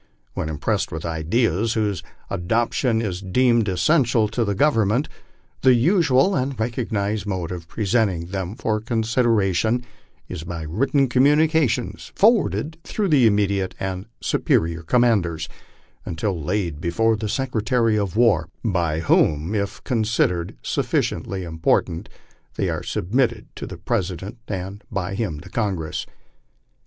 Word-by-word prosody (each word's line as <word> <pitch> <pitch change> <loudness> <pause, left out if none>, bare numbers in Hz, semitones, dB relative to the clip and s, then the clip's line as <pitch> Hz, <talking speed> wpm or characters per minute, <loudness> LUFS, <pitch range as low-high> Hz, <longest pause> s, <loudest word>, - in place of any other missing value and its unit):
When 80 - -3
impressed 75 -2 -1
with 80 0 -5
ideas 90 +6 0
whose 105 -5 -1 0.3
adoption 115 +5 0
is 95 -4 -3
deemed 115 +3 +2
essential 120 - +3
to 115 +2 0
the 100 -2 -1
Government, 120 0 +2 0.5
the 130 -1 +6
usual 150 - +3
and 130 -5 -1
recognized 110 -3 -2
mode 90 -4 -3
of 85 -2 -6
presenting 100 -4 0
them 95 +1 -4
for 110 -2 -1
consideration 115 -2 +1 0.4
is 90 -3 -6
by 85 -2 -5
written 135 - +1
communications 150 +2 +2
forwarded 195 -7 +2
through 205 -3 -2
the 135 -7 +5
intermediate 100 -2 +1
and 95 +1 -4
superior 80 0 +1
commanders 90 -5 +1 0.6
until 85 0 -3
laid 85 -4 -2
before 115 +7 +2
the 110 0 -4
Secretary 115 -2 +1
of 100 -3 -1
War, 100 -9 +3 0.2
by 85 -6 0
whom, 80 +2 +2
if 100 -2 -2
considered 105 -7 0
sufficiently 95 -1 -1
important, 80 0 0 0.5
they - - 0
are - - -2
submitted 115 +4 -1
to - - -6
the - - -8
Pres 90 - -1
ident, 95 +6 -7
and 95 +1 -5
by 100 -2 -2
him 95 -8 -2
to - - -12
Congress. 95 -9 -2
105 Hz, 130 wpm, -22 LUFS, 90-120 Hz, 0.6 s, the